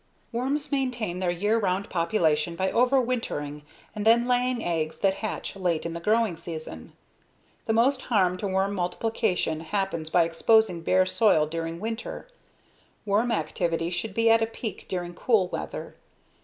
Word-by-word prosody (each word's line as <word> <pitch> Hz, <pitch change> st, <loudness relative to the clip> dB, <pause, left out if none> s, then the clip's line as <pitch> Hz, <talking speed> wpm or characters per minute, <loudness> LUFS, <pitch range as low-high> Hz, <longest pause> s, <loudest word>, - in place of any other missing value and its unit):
Worms 270 Hz, +5 st, -2 dB
maintain 250 Hz, -9 st, -1 dB
their 185 Hz, -1 st, 0 dB
year 205 Hz, +6 st, +1 dB
round 195 Hz, -1 st, 0 dB
population 170 Hz, -3 st, +1 dB
by 190 Hz, +2 st, 0 dB
overwintering 240 Hz, -, 0 dB, 0.3 s
and 210 Hz, -1 st, -4 dB
then 235 Hz, +2 st, +4 dB
laying 250 Hz, -1 st, +1 dB
eggs 160 Hz, -2 st, -1 dB
that 195 Hz, -1 st, +3 dB
hatch 215 Hz, -2 st, -4 dB
late 175 Hz, -5 st, -1 dB
in 170 Hz, -, -3 dB
the 170 Hz, -, -4 dB
growing 215 Hz, +1 st, +2 dB
season. 155 Hz, -, -8 dB, 0.7 s
The 225 Hz, -, +2 dB
most 255 Hz, +4 st, +3 dB
harm 190 Hz, -6 st, +2 dB
to 200 Hz, -, -3 dB
worm 190 Hz, +1 st, 0 dB
multiplication 185 Hz, -2 st, -1 dB
happens 170 Hz, -2 st, -2 dB
by 175 Hz, +1 st, +4 dB
exposing 175 Hz, +2 st, +3 dB
bare 185 Hz, +3 st, +3 dB
soil 185 Hz, -6 st, +3 dB
during 165 Hz, +1 st, -4 dB
winter. 225 Hz, -, -5 dB, 0.8 s
Worm 215 Hz, +4 st, +1 dB
activity 165 Hz, -2 st, -1 dB
should 190 Hz, +3 st, -3 dB
be 230 Hz, 0 st, +2 dB
at 225 Hz, 0 st, +5 dB
a 225 Hz, -, +2 dB
peak 225 Hz, -3 st, -7 dB
during 175 Hz, -1 st, -3 dB
cool 195 Hz, -1 st, +2 dB
weather. -, -, -6 dB
195 Hz, 155 wpm, -26 LUFS, 170-225 Hz, 0.8 s, at